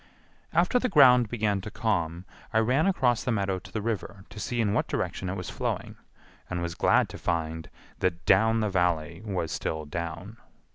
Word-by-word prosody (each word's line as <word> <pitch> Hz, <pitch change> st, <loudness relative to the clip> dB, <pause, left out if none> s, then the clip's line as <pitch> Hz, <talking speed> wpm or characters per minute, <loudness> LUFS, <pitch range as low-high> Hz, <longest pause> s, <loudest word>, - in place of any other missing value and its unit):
After 250 Hz, -, +3 dB
the 250 Hz, -, 0 dB
ground 125 Hz, -, +6 dB
began 105 Hz, -4 st, 0 dB
to 100 Hz, -, -6 dB
calm 90 Hz, -6 st, -1 dB, 0.3 s
I -, -, +1 dB
ran 125 Hz, -, +3 dB
across 125 Hz, -, +2 dB
the 125 Hz, -, -1 dB
meadow 100 Hz, -4 st, 0 dB
to -, -, -14 dB
the 110 Hz, -, -3 dB
river 105 Hz, -3 st, -4 dB
to 105 Hz, -, -9 dB
see 120 Hz, +3 st, -3 dB
in 105 Hz, -3 st, +2 dB
what -, -, +1 dB
direction 95 Hz, -, -3 dB
it 95 Hz, -, -3 dB
was 90 Hz, -2 st, -5 dB
flowing -, -, -3 dB, 0.5 s
and 90 Hz, -, -2 dB
was 85 Hz, -1 st, -3 dB
glad -, -, +3 dB
to -, -, -9 dB
find 80 Hz, -1 st, -2 dB, 0.3 s
that 85 Hz, -1 st, -1 dB
down 110 Hz, +4 st, +4 dB
the 105 Hz, -, 0 dB
Valley 85 Hz, -2 st, 0 dB
was 95 Hz, -6 st, -3 dB
still 80 Hz, -1 st, -3 dB
down. 85 Hz, +7 st, -6 dB
100 Hz, 190 wpm, -27 LUFS, 85-110 Hz, 0.5 s, ground